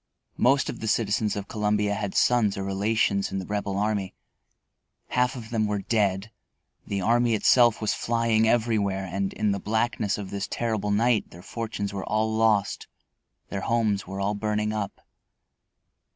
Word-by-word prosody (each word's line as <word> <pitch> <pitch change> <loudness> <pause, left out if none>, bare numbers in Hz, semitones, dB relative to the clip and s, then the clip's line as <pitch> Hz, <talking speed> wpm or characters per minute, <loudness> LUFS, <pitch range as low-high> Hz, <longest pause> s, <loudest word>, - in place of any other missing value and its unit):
Most 135 +2 +3
of 120 - -5
the 110 - -4
citizens 105 -1 +1
of 100 0 -5
Columbia 105 -1 0
had 100 -2 -3
sons 115 -5 +3
or 100 - -3
relations 100 +1 0
in 95 - -2
the 95 - -4
Rebel 100 -1 -2
army. 100 -2 -1 0.9
Half 125 +1 +1
of 115 -2 -9
them 110 -2 +1
were 105 -1 -2
dead, 100 -1 0 0.6
the 100 -1 -2
army 120 +3 +3
itself 120 +1 +4
was 110 - 0
flying 115 -1 +1
everywhere, 110 -5 +1
and 95 +1 -2
in 105 -1 0
the 100 - -1
blackness 110 -1 0
of 100 -2 -7
this 100 0 -3
terrible 110 -3 -2
night 110 +2 +2
their 85 +1 -13
fortunes 110 -3 -4
were 95 -1 -4
all 110 +1 0
lost, 110 -2 +1 0.6
their 100 - -3
homes 110 -4 0
were 95 +1 -5
all 100 +1 0
burning 105 0 -1
up. 105 -2 -4
105 Hz, 165 wpm, -26 LUFS, 100-115 Hz, 0.9 s, itself